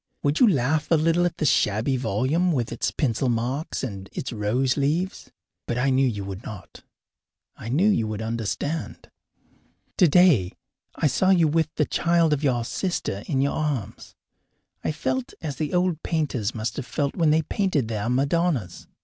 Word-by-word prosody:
Would 145 +2 +1
you 250 - +7
laugh 150 -1 +1
a 165 - +5
little 165 +3 +2
at 170 - -6
the 155 - -1
shabby 115 0 +2
volume 130 - +1
with 120 -5 -1
its - - -1
pencil 130 -2 0
marks 125 +7 -2
and 100 -6 -6
its 130 - -4
rose 120 +5 0
leaves? 155 +7 -1 0.4
But 120 - -2
I 135 +2 +2
knew 130 +1 +3
you 105 -5 -3
would 95 +1 -7
not; 100 -4 -10 0.7
I 115 - -8
knew 160 - +3
you 115 - +2
would 110 -1 -4
understand. 115 +8 -4 0.9
Today 170 - +5 0.4
I - - -1
saw 170 +7 +2
you 175 -4 +5
with 160 0 +1
the 150 - +2
child 170 -1 +2
of 150 0 -2
your 120 -4 +1
sister 145 - -2
in 135 -3 0
your 140 - +1
arms. 145 -9 -4 0.7
I - - 0
felt 130 -4 -3
as 150 -4 -5
the 155 -2 -2
old 180 -2 +1
painters 135 - -1
must 110 +1 -3
have 140 - -5
felt 140 -2 -2
when 165 -3 +2
they 160 +1 +3
painted 155 - 0
their 110 0 -2
Madonnas. 140 - 0
140 Hz, 175 wpm, -24 LUFS, 115-160 Hz, 0.9 s, you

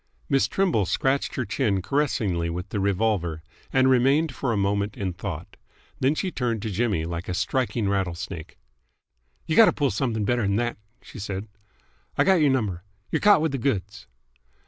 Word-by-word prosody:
Miss 135 - +3
Trimble 170 - +1
scratched 135 +1 0
her 130 - -1
chin 105 -2 0
caressingly 100 - 0
with 90 +3 -5
the 105 - -2
revolver, 95 -5 0 0.3
and 130 0 +4
remained 135 +5 +3
for 135 - -2
a 110 - 0
moment 100 +1 0
in 95 -3 -2
thought. 90 -3 -7 0.4
Then 135 +4 +2
she 185 +3 -2
turned 115 -7 -2
to 110 - -3
Jimmy 100 -5 0
like 85 +2 -5
a 90 - -1
striking 115 +2 0
rattlesnake. 90 -3 -3 0.9
"Y' 160 - -2
gotta 220 +6 +7
pull 140 -3 0
someth'g 110 -6 -1
better 120 -1 +1
th'n 100 - +1
that," 120 +2 -1 0.3
she - - -11
said. 100 +1 -4 0.7
"I - - +5
got 190 -3 +4
y'r 150 - +5
number. 105 -10 0 0.3
Y're - - +1
caught 205 -5 +6
with 160 - +1
th' 130 - -4
goods." 105 -5 -2
105 Hz, 175 wpm, -25 LUFS, 95-135 Hz, 0.9 s, gotta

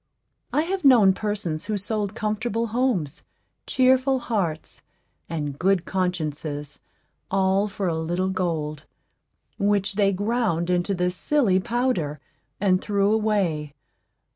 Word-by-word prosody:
I 300 - +2
have 370 +1 -3
known 235 -9 +7
persons 195 -5 -3
who 210 -1 -1
sold 205 +1 -2
comfortable 220 +1 -1
homes, 230 - 0 0.5
cheerful 260 +1 +3
hearts, 190 -11 -3 0.5
and 150 -4 -4
good 190 -1 +2
consciences, 155 -5 -3 0.5
all 195 +1 +2
for 200 -2 -3
a 170 - +1
little 175 +4 -1
gold, 160 -5 -2 0.7
which 200 0 +1
they 200 -1 +3
ground 200 -4 0
into 180 +2 +1
this 180 0 0
silly 230 -7 +2
powder, 210 - -1 0.4
and 185 -2 +2
threw 200 0 +1
away. 190 -9 0
195 Hz, 115 wpm, -24 LUFS, 170-215 Hz, 0.7 s, known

